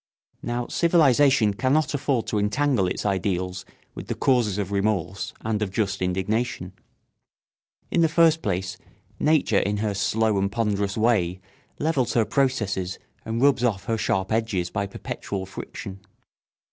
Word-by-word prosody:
] - - -44
Now 120 0 -1
civilisation 140 - +4
cannot 130 +9 +1
afford 135 -4 0
to 105 - -1
entangle 110 0 +1
its 90 - -3
ideals 95 -1 -1 0.3
with - - -8
the - - -2
causes 120 -7 +2
of 100 -1 -3
remorse 100 -1 -1
and 110 -1 -2
of 105 - 0
just 100 -2 -1
indignation. 95 +1 -1 1.2
In 170 - +2
the 165 - +4
first 165 0 +4
place 95 - -2 0.4
nature 150 -9 +3
in 105 +1 -1
her 105 0 -1
slow 105 +1 +1
and 100 +1 0
ponderous 100 -3 -1
way 100 -6 +2 0.4
levels 145 -6 0
her 115 -2 +3
processes 105 -10 0 0.3
and 115 +3 -1
rubs 140 -3 +4
off 105 -6 0
her 115 - 0
sharp 95 -1 0
edges 110 -6 0
by 100 -1 -2
perpetual 100 0 -5
friction. 95 0 -8
105 Hz, 145 wpm, -24 LUFS, 95-125 Hz, 1.2 s, civilisation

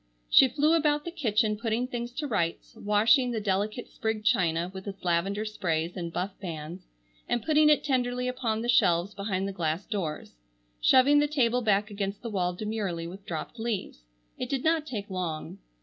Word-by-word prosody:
She 265 - +8
flew 300 +5 +2
about 300 -2 +2
the 340 - -4
kitchen 220 - +1
putting 230 +1 0
things 240 -2 -4
to 295 +4 -3
rights, 170 -9 -2
washing 225 +5 +3
the 235 -2 -1
delicate 210 +3 -1
sprigged 220 -1 -3
china 175 -6 +2
with 190 +1 -8
its 195 -1 -7
lavendar 195 +5 0
sprays 170 -5 -2
and 170 -2 -4
buff 185 +4 -2
bands, 170 0 -7 0.4
and 240 - 0
putting 305 +1 +4
it 300 - +4
tenderly 250 -3 0
upon 235 -3 -1
the - - -3
shelves 180 -5 +3
behind 195 -1 -2
the - - -3
glass 165 +1 -2
doors; 180 -9 -4 0.5
shoving 280 - +6
the 295 - +3
table 250 -4 +1
back 210 -1 +1
against 200 +1 -4
the 230 - -4
wall 180 -3 0
demurely 200 -5 -3
with 190 +4 -10
dropped 170 +7 -5
leaves. 220 - -3 0.4
It 250 - -3
did 275 -2 -1
not 320 -1 +2
take 210 -7 -5
long. 180 -5 -4
215 Hz, 180 wpm, -28 LUFS, 185-250 Hz, 0.5 s, She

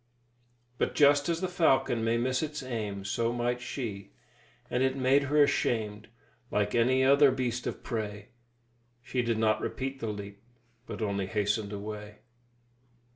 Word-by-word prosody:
But - - 0
just 145 +1 +5
as 170 0 0
the 185 - 0
falcon 135 -9 +2
may 115 +1 +2
miss 130 +2 0
its 150 -2 -4
aim, 105 -6 -4
so 115 +4 0
might 120 +1 -1
she, 120 - -5 0.5
and 125 - -1
it 130 0 +2
made 135 +2 +3
her 145 +2 +4
ashamed, 110 -6 0 0.4
like 105 0 0
any 130 +3 +3
other 140 +1 +6
beast 125 -2 -2
of - - -5
prey; 105 -3 -4 0.7
she 125 0 -1
did 115 -2 0
not 110 -1 +2
repeat 135 +1 -4
the 115 - -3
leap, 100 -1 -6 0.5
but - - -4
only 100 -2 -1
hastened 105 0 -1
away. 105 +1 -6
120 Hz, 150 wpm, -29 LUFS, 105-130 Hz, 0.7 s, other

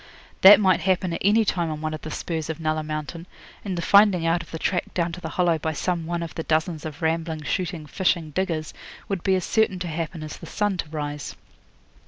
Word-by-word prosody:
That 195 +1 +10
might 190 -3 +4
happen 185 0 0
at - - -4
any 215 +3 +4
time 170 -4 0
on 155 -1 -4
one 155 0 -3
of 155 - -6
the 155 - -6
spurs 160 0 -4
of 160 - -4
Nulla 155 -1 0
Mountain; 155 +3 -5 0.4
and 190 -3 -3
the 170 - -2
finding 200 -3 +5
out 165 +1 +2
of 165 - -13
the 160 - -5
track 175 +2 -1
down 170 -1 0
to 180 +2 -8
the 160 - -5
Hollow 170 -2 +1
by 160 +1 -2
some 170 +1 -2
one 170 0 -2
of 165 - -7
the - - -4
dozens 160 0 -1
of 155 +1 -7
rambling, 160 -1 -1
shooting, 170 +1 -2
fishing 165 -1 0
diggers 165 -3 -2 0.3
would 195 -3 -2
be 190 +1 +2
as 185 - -1
certain 220 -4 +2
to 180 0 -4
happen 165 0 -4
as 155 - -7
the - - -10
sun 205 -3 -1
to 160 - -4
rise. 145 -2 -5
165 Hz, 235 wpm, -24 LUFS, 155-185 Hz, 0.4 s, That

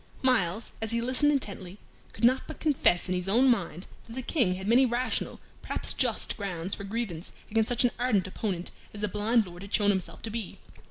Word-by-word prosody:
Myles, 225 -5 +1
as 220 0 -2
he 235 - +1
listened 255 +5 +2
intently, 200 -9 -3 0.3
could - - -11
not 255 +2 +4
but 315 - -8
confess 275 - +2
in 185 - 0
his 180 +1 -1
own 250 +5 +5
mind 180 -5 -2 0.2
that 225 - -10
the 260 +1 -4
King 235 - +1
had 190 +1 -6
many 240 +4 +6
rational, 250 0 -1 0.2
perhaps - - 0
just, - - +1
grounds 190 -3 -3
for - - -4
grievance 200 -5 -4 0.2
against 225 +2 +2
such 245 0 +3
an 245 - +3
ardent 240 -7 +2
opponent 185 -2 -4 0.2
as 205 - -7
the 210 - +1
blind 210 +3 +2
Lord 175 -1 -10
had 200 0 -10
shown 205 -1 +4
himself 180 -4 -4
to 225 - -4
be. 225 -3 -5
215 Hz, 210 wpm, -28 LUFS, 185-245 Hz, 0.3 s, many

